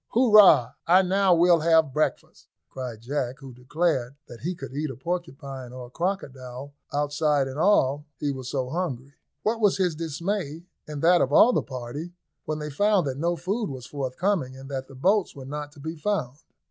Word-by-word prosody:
"Hurrah 210 - +7 0.2
I 185 +3 +6
now 190 0 +3
we'll 170 0 +5
have 160 -3 +3
breakfast," 155 - -2 0.2
cried 125 -4 -6
Jack, 130 0 -2
who 135 -4 -11
declared 130 0 -1
that 120 - -11
he 180 +4 -3
could 165 - -9
eat 150 +2 -2
a 130 - -6
porcupine 140 -5 -5
or 125 -1 -8
a - - -14
crocodile, 140 -7 -4 0.2
outside 145 -1 +1
and 135 +2 -6
all, 150 -7 +3
he 145 - -1
was 130 -2 -6
so 130 -2 -2
hungry. 140 -5 -4 0.3
What 225 +1 0
was 205 -2 +4
his 180 -3 +1
dismay, 165 +1 -3 0.2
and 150 -1 -6
that 175 +1 +5
of 135 - +1
all 235 +11 +6
the - - +2
party, 135 +6 -7 0.3
when 155 - -2
they 150 0 -5
found 205 +4 +2
that 135 -1 -3
no 170 +2 +1
food 200 +6 -2
was 130 -3 -7
forthcoming, 140 +1 -2
and 135 +1 -10
that 135 -1 -4
the 135 - -13
boats 190 +8 +1
were 135 -2 -9
not 145 +1 -6
to 145 - -16
be 160 +3 -5
found. 155 -7 -2
150 Hz, 190 wpm, -25 LUFS, 130-175 Hz, 0.3 s, Hurrah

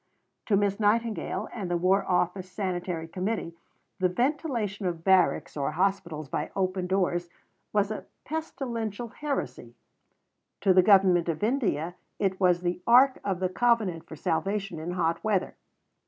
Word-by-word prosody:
To 200 - +3
Miss 200 0 +1
Nightingale 215 -1 0
and 200 -6 -4
the 175 - +1
War 190 +3 +3
Office 180 +1 0
Sanitary 180 -4 -3
Committee 185 0 -3 0.5
the 185 -1 +3
ventilation 235 - -1
of 170 -2 -4
barracks 190 -2 +3
or 145 0 -1
hospitals 170 -4 -1
by - - -3
open 185 -1 -1
doors 175 -2 0 0.4
was 205 0 +1
a 215 - -6 0.2
pestilential 240 -8 -4
heresy; 290 +4 -4 0.9
to 190 - +4
the 185 - +7
Government 185 -3 +5
of 160 +3 -2
India 205 - 0 0.2
it 190 -2 0
was 180 -2 +3
the 180 0 -2
ark 255 +3 +6
of 190 -3 -1
the 185 - +1
covenant 215 -5 +1
for - - -8
salvation 175 +4 -2
in 170 +3 -4
hot 170 -2 0
weather. 210 -4 0
190 Hz, 145 wpm, -27 LUFS, 175-215 Hz, 0.9 s, the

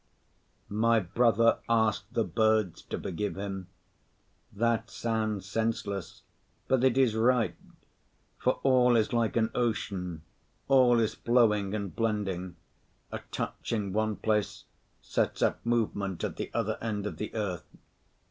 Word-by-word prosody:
My 115 +2 +3
brother 115 +4 +3
asked 110 -2 +1
the 115 - +3
birds 110 -5 +1
to - - -5
forgive 95 +3 -3
him; 95 -2 -5 0.8
that 115 +1 0
sounds 110 -4 -2
senseless, 100 -3 -3 0.4
but 130 -1 +2
it 130 -1 +3
is 130 -5 +4
right; 115 +1 +2 0.8
for 130 - +2
all 125 -2 +5
is 110 0 +2
like 115 -2 +1
an 110 0 +2
ocean, 95 -8 -2 0.4
all 125 -3 +5
is 110 -1 +1
flowing 105 -4 +2
and 100 -6 -4
blending; 100 -5 -2 0.6
a - - -4
touch - - -4
in 105 -4 -1
one 110 0 0
place 105 -1 -1 0.4
sets - - 0
up - - 0
movement 100 -6 -1
at - - -2
the - - -4
other 110 -1 -1
end 105 -3 -2
of 105 - -4
the 105 - -4
earth. 100 -6 -3
110 Hz, 135 wpm, -29 LUFS, 100-115 Hz, 0.8 s, all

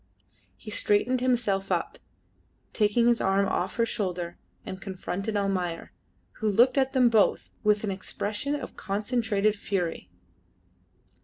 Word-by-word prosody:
He 215 - -9
straightened 245 +5 +1
himself 220 -6 +1
up, - - -1 0.7
taking 215 +2 +3
his 240 -1 +3
arm 195 +1 +2
off 185 0 -1
her 230 - +2
shoulder, 180 -6 -3 0.3
and 190 0 -7
confronted 195 +2 -3
Almayer, 185 -4 -2 0.5
who 220 - +1
looked 240 +5 +4
at 270 -1 +2
them 255 -2 +5
both 220 -3 +2
with 210 0 +3
an 205 - -1
expression 210 +8 -3
of 290 - -6
concentrated 210 0 0
fury. 180 - -3
205 Hz, 130 wpm, -27 LUFS, 195-235 Hz, 0.7 s, them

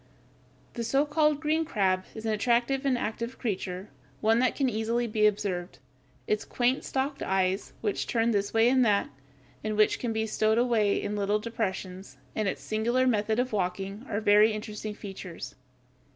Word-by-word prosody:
The 235 - -3
so 275 +5 +2
called 300 0 +2
green 315 +1 +1
crab 190 -10 0
(Fig. - - -23
148) - - -9
is 220 - -7
an 220 - +1
attractive 240 +5 +1
and 255 -2 +2
active 235 +2 -4
creature, 190 -4 -3 0.3
one 225 +2 +3
that 255 0 +2
can 275 - +1
easily 230 +1 0
be 215 -2 +3
observed. 190 -4 -2 0.5
Its 210 - 0
quaint 250 +2 0
stalked 275 +1 -2
eyes, 190 0 0
which 210 -3 -1
turn 230 0 +2
this 200 -2 0
way 225 +1 +4
and 255 +1 +4
that, 205 -3 +2 0.5
and 215 -1 -2
which 215 - +3
can 240 - -2
be 220 0 0
stowed 220 0 +1
away 230 -4 +2
in 210 - -3
little 205 0 +1
depressions, 190 - -4 0.2
and 215 - 0
its - - -3
singular 235 +4 +1
method 220 -3 +1
of 250 -1 0
walking, 195 +2 -2
are 205 - -1
very 210 +1 +5
interesting 215 0 -5
features. 190 -4 -8
220 Hz, 180 wpm, -28 LUFS, 205-240 Hz, 0.5 s, very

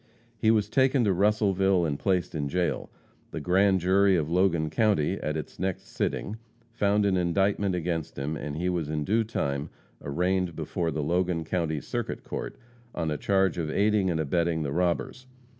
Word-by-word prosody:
He 110 - +1
was 110 -2 +3
taken 130 +2 +3
to 100 -3 +3
Russellville 95 -2 +2
and 70 -3 -2
placed 95 -3 0
in 70 -3 -2
jail. 90 +3 -1 0.4
The - - -5
grand 95 +3 +3
jury 95 +2 +4
of 80 -2 -1
Logan 85 -4 +2
county 100 -3 +1
at 75 +1 -2
its 75 - -7
next 95 0 -2
sitting 105 +3 -2 0.3
found 105 -2 +2
an 95 -2 +2
indictment 95 +2 +1
against 85 -2 -3
him, 70 +3 -2
and 75 0 -5
he 90 +2 -1
was 85 -4 -1
in 75 -1 -1
due 110 +7 +2
time 70 -9 -2 0.3
arraigned 90 +3 0
before 80 +2 -2
the 75 -1 -2
Logan 85 +1 0
county 80 -2 -1
circuit - - -4
court - - -5 0.4
on 80 -1 -1
a 75 - -1
charge 95 -2 +1
of 80 -2 -2
aiding 100 +2 +2
and 80 -2 0
abetting 80 +1 0
the 70 - -3
robbers. 90 - -1
90 Hz, 175 wpm, -27 LUFS, 80-100 Hz, 0.4 s, jury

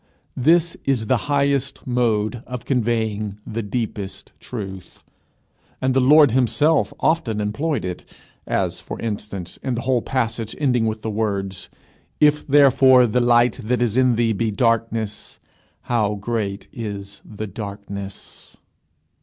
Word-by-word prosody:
This 165 +5 +3
is 130 -5 0
the 130 - +2
highest 140 -1 0
mode 120 -2 0
of 125 -1 -6
conveying 110 -5 -1
the 115 +1 -3
deepest 105 -3 -5
truth; 95 -6 -8 0.8
and 130 0 +1
the 135 - +3
Lord 145 +1 +6
himself 130 +6 +2
often 130 -10 +1
employed 110 - -1
it, 90 -1 -5 0.4
as, 90 -2 -1
for 90 - -8
instance, 105 -5 -5
in 130 -2 -2
the 120 - -3
whole 125 -1 +1
passage 115 -4 -2
ending 125 -6 +1
with 110 0 -3
the 110 - -2
words, 100 -3 -3 0.5
"If 150 0 +3
therefore 135 -3 +6
the 120 +2 +1
light 120 0 +3
that 120 +2 0
is 120 -3 0
in 130 -2 +4
thee 115 -1 +2
be 110 +2 -1
darkness, 115 -1 -1 0.4
how 105 -3 0
great 105 -1 -3
is 100 -3 -7
the 110 0 -7
darkness!" 100 -1 -8
115 Hz, 135 wpm, -21 LUFS, 105-130 Hz, 0.8 s, Lord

